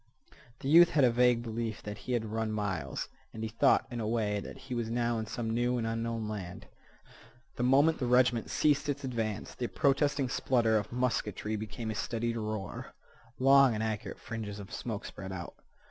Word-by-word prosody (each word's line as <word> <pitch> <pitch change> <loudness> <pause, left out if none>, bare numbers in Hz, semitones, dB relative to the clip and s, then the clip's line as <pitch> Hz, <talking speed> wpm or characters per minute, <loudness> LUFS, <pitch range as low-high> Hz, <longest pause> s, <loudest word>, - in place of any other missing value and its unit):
The - - -4
youth 170 +4 +8
had 145 - +3
a 125 - +6
vague 120 0 +3
belief 115 -1 -4
that 105 0 -6
he - - +1
had 115 -2 0
run 110 0 -2
miles, 95 -10 -2 0.3
and 110 - -5
he 110 - -2
thought, 130 +5 +3
in 120 - -4
a 110 - -2
way, 105 -2 0
that - - -8
he 130 -1 -8
was 120 -2 -2
now 120 0 0
in 110 - -4
some 115 0 -3
new 120 +1 +1
and 115 - -1
unknown 115 -1 -2
land. 95 -5 -6 0.9
The - - -4
moment 140 +6 +4
the 125 - -1
regiment 125 -2 +3
ceased 150 -1 +2
its 140 0 -2
advance 115 -5 -3
the 120 - -3
protesting 140 0 +1
splutter 120 -3 +2
of 100 - -7
musketry 110 -4 -1
became 110 +1 -4
a - - -2
steadied 115 +2 -2
roar. 105 -5 -5 0.4
Long 135 -2 +6
and 110 - -1
accurate 110 -1 -3
fringes 105 -3 -6
of 100 - -9
smoke 110 -4 -4
spread 95 -1 -7
out. 90 -2 -6
115 Hz, 190 wpm, -31 LUFS, 110-125 Hz, 0.9 s, youth